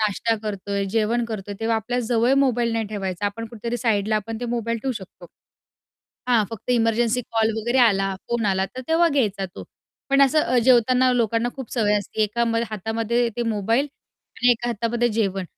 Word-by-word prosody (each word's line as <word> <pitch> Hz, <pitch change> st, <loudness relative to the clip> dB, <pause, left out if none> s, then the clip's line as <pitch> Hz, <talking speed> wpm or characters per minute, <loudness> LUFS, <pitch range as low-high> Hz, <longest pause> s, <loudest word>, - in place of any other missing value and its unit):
नाश्ता 215 Hz, +2 st, +1 dB
करतोय, 200 Hz, -1 st, -3 dB
जेवण 225 Hz, +3 st, +1 dB
करतोय 210 Hz, -3 st, -6 dB
तेव्हा 225 Hz, 0 st, +1 dB
आपल्या 245 Hz, +3 st, -2 dB
जवळ 240 Hz, +2 st, +2 dB
मोबाईल 240 Hz, -3 st, +1 dB
नाही 225 Hz, -1 st, -1 dB
ठेवायचा. 200 Hz, -2 st, -3 dB
आपण 230 Hz, +3 st, -4 dB
कुठेतरी 235 Hz, +1 st, -5 dB
साईडला 215 Hz, -3 st, +1 dB
आपण 220 Hz, +2 st, -5 dB
ते -, -, -3 dB
मोबाईल 230 Hz, 0 st, -2 dB
ठेवू 265 Hz, -1 st, -1 dB
शकतो. 190 Hz, -4 st, -10 dB, 1.0 s
हां, 230 Hz, -3 st, +4 dB
फक्त 225 Hz, +2 st, -6 dB
इमर्जन्सी 230 Hz, 0 st, +2 dB
कॉल 225 Hz, -1 st, +2 dB
वगैरे 240 Hz, +4 st, 0 dB
आला, 195 Hz, -5 st, +3 dB
फोन 235 Hz, -2 st, 0 dB
आला 190 Hz, -1 st, +1 dB
तर -, -, -3 dB
तेव्हा 335 Hz, +1 st, +4 dB
घ्यायचा 215 Hz, -10 st, 0 dB
तो, -, -, -8 dB, 0.5 s
पण 275 Hz, 0 st, +5 dB
असं 275 Hz, +3 st, +4 dB
अ, 255 Hz, -, +1 dB
जेवताना 255 Hz, +1 st, +4 dB
लोकांना 230 Hz, 0 st, +1 dB
खूप 265 Hz, -4 st, -8 dB
सवय 210 Hz, -4 st, +2 dB
असते. 210 Hz, +2 st, -3 dB
एका 235 Hz, +3 st, 0 dB, 0.3 s
हातामध्ये 225 Hz, +3 st, -1 dB
ते 240 Hz, -, 0 dB
मोबाईल 225 Hz, +4 st, 0 dB, 0.5 s
आणि 245 Hz, 0 st, +4 dB
एका 240 Hz, 0 st, 0 dB
हातामध्ये 235 Hz, +1 st, 0 dB
जेवण. 200 Hz, -4 st, -1 dB
230 Hz, 175 wpm, -23 LUFS, 210-240 Hz, 1.0 s, पण